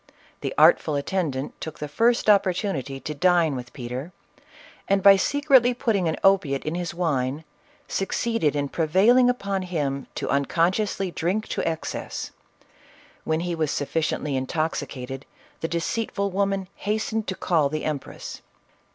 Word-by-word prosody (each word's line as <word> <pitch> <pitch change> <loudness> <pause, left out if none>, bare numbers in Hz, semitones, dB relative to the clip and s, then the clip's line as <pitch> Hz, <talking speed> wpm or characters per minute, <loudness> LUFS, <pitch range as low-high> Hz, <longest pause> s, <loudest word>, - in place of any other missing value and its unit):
The - - -3
artful 150 - +5
attendant 140 -3 -2
took 160 - -6
the 150 - -5
first 230 +11 +2
opportuni 195 - +2
ty 135 +1 -7
to 150 +3 -5
dine 170 -1 +3
with 125 -1 -7
Peter, 130 +5 -6 0.8
and, 195 -1 +2
by 200 -1 +9
secretly 260 +2 +3
putting 210 -7 +1
an 160 - 0
opi 190 -8 +4
ate 135 - -6
in 155 - -2
his 175 0 -3
wine, 145 -4 -1 0.4
succeeded 195 - 0
in 145 -1 -1
prevailing 200 - +4
upon 200 -6 -1
him 145 -7 -2
to - - -3
unconsciously 180 +7 +1
drink 185 +7 -1
to - - -1
excess; 160 -1 -5 0.9
when 160 +1 0
he 175 0 -2
was 160 -3 0
sufficient 150 +3 -1
ly 150 - -2
intoxicated 135 -1 -3 0.4
the 165 - -2
deceitful 200 +4 -2
woman 195 0 0
hastened 220 +1 -2
to 190 - -2
call 160 -7 +1
the 155 +1 -3
empress. 150 -3 -5
170 Hz, 145 wpm, -24 LUFS, 145-195 Hz, 0.9 s, by